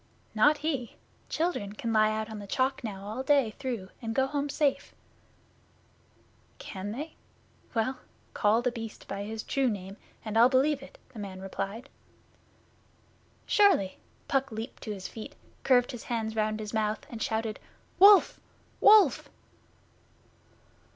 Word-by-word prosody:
'Not 295 +8 +4
he. 270 -7 -2 0.3
Children 315 - -1
can 225 +2 -3
lie 215 0 +4
out 215 0 -2
on 215 - -6
the 200 - -9
Chalk 260 +5 0
now 200 -4 -5
all 220 +5 -4
day 270 -4 +3
through 240 -9 -4
and 225 -1 -4
go 265 - +3
home 285 +1 -2
safe.' 285 -1 0 1.6
'Can 195 +1 -6
they? 295 +8 -6 0.6
Well, 245 +4 0 0.3
call 220 +3 +2
The 250 - +1
Beast 225 -2 -8
by 195 +1 -4
his 220 +1 -5
True 270 -2 +1
Name, 195 -2 -6 0.3
and 220 +1 0
I'll 240 +2 +7
believe 275 +2 +2
it,' - - -13 0.2
the 225 - -9
man 195 -2 -7
replied. 195 +5 -5 1.6
'Surely!' 385 - +3 0.3
Puck 270 -1 0
leaped 220 +2 -7
to 215 - -5
his 195 -2 -5
feet, 230 +6 -9 0.3
curved 245 -2 +3
his 245 - -8
hands 225 -2 -2
round 215 0 0
his 215 0 -6
mouth 215 -1 -1
and 230 -2 -8
shouted: 220 -1 -2 0.4
'Wolf! 400 +1 +7 0.4
Wolf! 425 -1 +6
225 Hz, 145 wpm, -29 LUFS, 215-270 Hz, 1.6 s, I'll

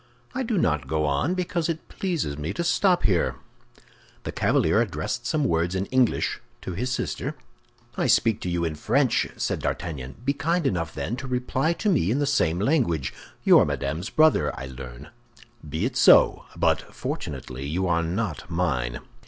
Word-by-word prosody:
"I 260 - -2
do 230 -4 -1
not 75 - +1
go 75 +1 0
on 75 - +1
because 175 -2 -1
it 165 -1 -4
pleases 165 - -2
me 75 +2 -4
to 170 - -2
stop 180 +1 +3
here." 90 -5 +2 0.9
The - - -4
cavalier - - +2
addressed 120 +1 -3
some 155 -2 +1
words 85 -6 +1
in 95 +1 0
English 130 -3 +1 0.2
to 95 - -4
his 125 +9 -2
sister. - - -3 0.6
"I - - 0
speak 110 -2 +3
to 90 - -3
you 85 -1 0
in 80 - -1
French," 120 - +1
said - - -1
D'Artagnan; 70 -6 -4
"be 140 - +2
kind 165 +3 0
enough, 90 -10 -1
then, 120 - -3
to 135 - -6
reply 130 +5 0
to 210 - -3
me 145 - +3
in 120 - +1
the 145 - +1
same 85 - +2
language. 105 - +1 0.3
You - - +7
are - - +4
Madame's 80 +9 -3
brother, 155 -1 +4
I 65 - -5
learn—be 75 - -8
it 125 0 -2
so; - - +6
but - - +2
fortunately 65 +2 -5
you 90 +5 -1
are 85 -1 +2
not 85 - -3
mine." 65 -9 -1
100 Hz, 175 wpm, -25 LUFS, -, 0.9 s, You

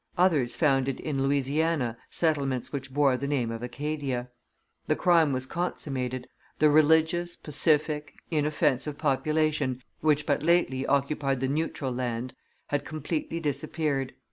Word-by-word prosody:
Others 160 -9 +3
founded 135 -4 +2
in 140 -3 -2
Louisiana 140 -1 +1
settlements 140 -7 0
which 135 -1 -4
bore 140 -2 +3
the 140 - -3
name 130 -5 0
of 115 0 -5
Acadia. 130 -1 -3 0.6
The - - +2
crime 165 -4 +4
was 130 -1 0
consummated: 130 -6 -3 0.3
the 150 0 +5
religious, 160 +3 +3
pacific, 150 0 0 0.2
inoffensive 150 -2 +1
population, 150 -2 0 0.2
which 150 -1 +2
but 145 - +1
lately 155 -5 +2
occupied 140 -1 +1
the 130 - 0
neutral 145 -2 -2
land, 125 0 -3 0.4
had 145 -1 0
completely 155 +2 -3
disappeared. 145 -3 -2
145 Hz, 125 wpm, -28 LUFS, 130-155 Hz, 0.6 s, the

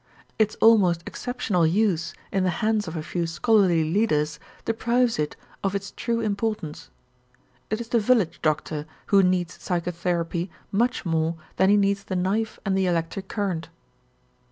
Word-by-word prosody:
Its 215 -1 +2
almost 190 -7 +4
exceptional 220 -9 0
use 170 -3 +1 0.2
in 195 -1 +1
the 185 - +2 0.2
hands 215 -2 +1
of 160 - -5
a 155 - -3
few 170 +1 -2
scholarly 175 0 +3
leaders 155 -4 +1 0.3
deprives 235 0 +1
it 150 -1 -1 0.3
of 195 0 0
its 200 -1 -4
true 230 -1 -2
importance. 210 -6 -3 0.8
It 215 - -1
is 235 -1 -6
the 235 - +3
village 220 -5 +2
doctor 155 0 -1 0.3
who 200 - +8
needs 180 -3 0
psychotherapy 175 0 -1 0.2
much 240 +4 +1
more 165 0 0 0.2
than 190 - +4
he 205 - +6
needs 200 0 +1
the 190 - -3
knife 200 +5 -1
and 195 -1 +1
the 190 -1 +2
electric 175 +3 -2
current. 185 -7 -2
190 Hz, 155 wpm, -25 LUFS, 170-215 Hz, 0.8 s, who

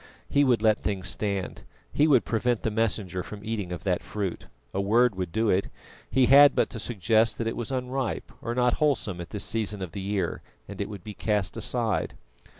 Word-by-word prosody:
He 145 - +3
would 120 -5 +2
let 110 -1 +4
things 95 -3 -2
stand; 100 0 -3 0.3
he 150 - +4
would 130 - +4
prevent 115 +5 0
the 110 - 0
Messenger 105 -4 -1
from 105 +3 -9
eating 105 -5 -3
of 90 - -5
that 90 -3 0
fruit. 95 0 -4 0.3
A 100 - 0
word 115 +5 +4
could 90 -2 -3
do 110 +2 +1
it; 95 +2 +1 0.4
he 130 -1 +4
had 140 +2 +8
but - - +1
to 115 - -6
suggest 110 +1 +2
that 115 - -2
it 115 - -2
was 120 +2 -4
unripe 130 -1 -3
or 120 0 -3
not 125 -1 +3
wholesome 115 -12 +1
at 85 - -8
this 105 - -3
season 105 -2 -1
of 95 -3 -5
the 100 - -5
year, 100 0 -2 0.3
and 100 0 -6
it 100 - -3
would 100 -4 -8
be 105 - -7
cast 105 -5 -1
aside. 115 -5 -1
110 Hz, 210 wpm, -27 LUFS, 95-120 Hz, 0.4 s, had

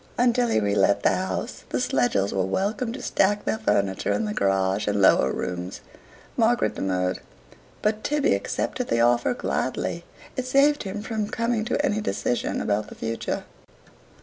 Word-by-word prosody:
Until 245 0 +3
he 170 - +2
relet 100 -1 +2
the - - +5
house, 95 0 -3
the - - -1
Schlegels 100 -5 +1
were 95 - +1
welcome 205 - -1
to 260 - -7
stack 205 +2 +1
their 220 - 0
furniture 100 - 0
in 225 - 0
the 210 - -2
garage 95 - +1
and 105 0 +1
lower 65 -8 +5
rooms. 90 +1 -4 0.5
Margaret - - +2
demurred, 90 -1 -1 0.6
but 215 0 0
Tibby 295 0 +2
accepted 250 - -2
the 115 - +1
offer 120 - +3
gladly; - - -2 0.3
it 255 -1 -3
saved 285 +3 +4
him 205 +1 -5
from 215 -2 -2
coming 230 -1 -1
to 290 +5 0
any 215 -6 0
decision 125 - -1
about 105 +1 0
the - - -11
future. 115 0 -3
125 Hz, 160 wpm, -25 LUFS, -, 0.6 s, the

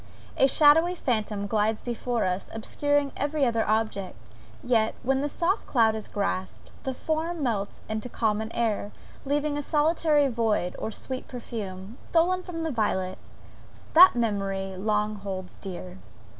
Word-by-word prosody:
A 270 - +5
shadowy 320 +5 +5
phantom 215 - -1
glides 215 +1 +1
before 240 -1 -2
us, 185 +1 -2
obscuring 290 +5 0
every 290 0 0
other 230 -2 +1
object; 215 - -1 0.5
yet 225 -3 +2
when 265 +1 +2
the 290 +2 -1
soft 350 +7 0
cloud 225 -4 +3
is 220 -1 -6
grasped, 190 -2 -3
the 265 - -3
form 320 +2 -2
melts 205 -5 -2
into 220 +2 -4
common 220 -1 -1
air, 215 -3 -1 0.3
leaving 290 +1 0
a - - -1
solitary 300 -1 +2
void, 225 -7 0
or - - -3
sweet 255 +4 -6
perfume, 215 -3 -7
stolen 355 +2 +2
from 340 -3 -5
the 320 - -1
violet, 190 -6 -1 0.7
that 360 -1 +9
memory 195 -4 -1
long 210 +2 0
holds 190 -2 -6
dear. 185 -1 -8
230 Hz, 145 wpm, -27 LUFS, 205-290 Hz, 0.7 s, that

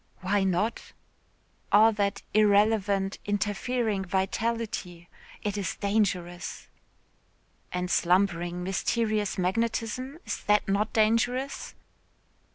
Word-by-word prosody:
"Why 195 +1 +1
not?" 195 +5 -1 0.8
"All 220 +2 +7
that 200 -2 -1
irrelevant, 205 -2 +3
interfering 205 +1 -1
vitality. 190 -2 -2 0.4
It 205 -1 -2
is 190 - -2
dangerous." 190 -4 -1 1.1
"And 180 0 -2
slumbering, 175 -1 +1
mysterious 210 +2 0
magnetism, 230 - -1
is - - -4
that 210 0 +3
not 200 +2 +1
dangerous?" 235 +5 0
205 Hz, 85 wpm, -27 LUFS, 190-220 Hz, 1.1 s, All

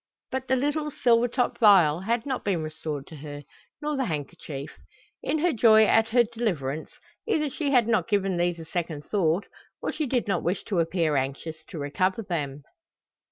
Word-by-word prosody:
But 260 0 -3
the 260 - +3
little 295 +3 0
silver 240 -4 +3
topped 245 +1 -1
vial 185 -9 +6
had 225 +5 -1
not 265 -2 -2
been 180 -6 0
restored 155 -2 -5
to 160 - -11
her, 145 0 -8 0.4
nor 300 0 -1
the 270 -1 0
handkerchief. 150 - -5 0.5
In - - 0
her 335 +1 +2
joy 220 -2 +6
at 225 +1 +4
her 240 +1 +4
deliverance, 180 - -3 0.4
either 305 -10 +1
she 290 0 -2
had 245 -5 +4
not 220 -7 +2
given 195 -3 +1
these 175 0 +1
a 165 - -8
second 160 -3 -4
thought, 185 -2 +1 0.3
or - - -2
she 305 - -2
did 245 -3 0
not 195 -5 +1
wish 180 +3 -1
to 195 -5 -1
appear 165 -2 +1
anxious 140 +4 -3
to 175 - -8
recover 185 +9 0
them. 145 -7 -3
190 Hz, 185 wpm, -26 LUFS, 155-240 Hz, 0.5 s, vial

